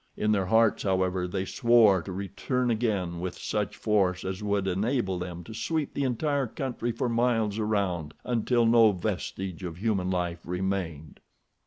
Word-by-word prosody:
In 105 - +1
their 100 -3 +1
hearts, 110 +1 +3
however, 95 -2 0
they 95 +1 -2
swore 115 -4 +4
to 95 - -7
return 110 +6 -2
again 100 -7 -1
with 90 0 -4
such - - -2
force 95 -4 +1
as 95 +2 -4
would 100 -2 0
enable 95 0 0
them 90 -1 -6
to 110 - -10
sweep 155 +5 -2
the 140 - -1
entire 140 +2 0
country 120 0 -3
for 120 +3 -2
miles 115 -3 +1
around, 95 -8 -1
until 120 0 +1
no 115 -2 +6
vestige 95 -1 -4
of 85 -2 -5
human 100 -3 0
life 90 -2 -1
remained. 90 -4 -3
100 Hz, 160 wpm, -28 LUFS, 90-115 Hz, -, no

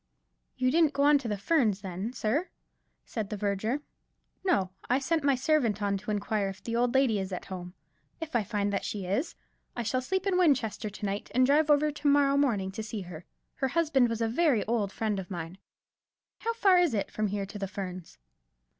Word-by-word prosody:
"You 255 0 +2
didn't 320 -1 +4
go 280 0 +1
on 290 0 +6
to 260 - -6
the 210 -2 -1
Ferns, 215 - +2
then, 190 +3 -4
sir?" 260 +9 -1 0.6
said 215 -4 -4
the 210 - -4
verger. 210 +7 -1 0.6
"No, 195 - +1 0.2
I 250 - +4
sent 300 +3 0
my 280 -1 +4
servant 255 -6 +1
on 200 -1 0
to 200 - -8
inquire 205 -1 0
if 195 0 -10
the 230 - -3
old 245 +1 +1
lady 255 -6 +3
is 190 0 -4
at 180 - -5
home. 180 -1 -7 0.4
If 320 -3 -6
I 230 - +3
find 205 -1 -1
that 195 - -1
she 200 -3 -4
is, 210 - -1 0.4
I 240 - -2
shall 255 +3 0
sleep 380 +8 -2
in 375 -2 +2
Winchester 245 - +2
to 205 +1 -7
night, 200 +1 -3
and 255 0 +5
drive 295 +3 +3
over 300 +1 +4
to 295 0 -3
morrow 280 -1 +4
morning 220 -10 +1
to 210 - -5
see 215 -1 -5
her. 175 -2 -9 0.3
Her 265 - +1
husband 280 -5 +2
was 230 0 -3
a 225 - +2
very 265 -1 +2
old 215 -3 0
friend 215 -2 -1
of 180 - -7
mine. 175 0 -6 0.8
How 460 0 -2
far 390 -5 +5
is 340 -9 +2
it 200 - -2
from 215 0 -1
here 200 0 -2
to 200 +1 -8
the 195 - -2
Ferns?" 185 -3 -7
225 Hz, 215 wpm, -29 LUFS, 200-280 Hz, 0.8 s, on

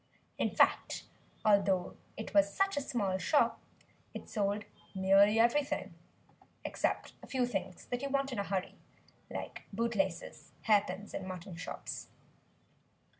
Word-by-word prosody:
In - - +2
fact, - - +2 0.4
although 195 -3 +3 0.2
it 220 - -6
was 200 -1 +5
such 390 - +1
a 285 - 0
small 205 -9 -1
shop 295 +9 +3 0.5
it - - -6
sold 205 -1 -1 0.3
nearly 195 +3 +5
everything 275 +5 +2 0.7
except - - -1
a - - -11
few 255 -2 +1
things 195 -6 -4
that 245 0 -3
you 280 - -2
want 275 0 0
in 245 - -2
a - - +1
hurry 195 -2 -2 0.6
like - - -6
bootlaces, 200 -5 -2
hair 210 -2 +5
pins 190 +3 -6
and 190 - -4
mutton 185 0 -6
chops. 175 - -6
205 Hz, 135 wpm, -33 LUFS, 190-245 Hz, 0.7 s, was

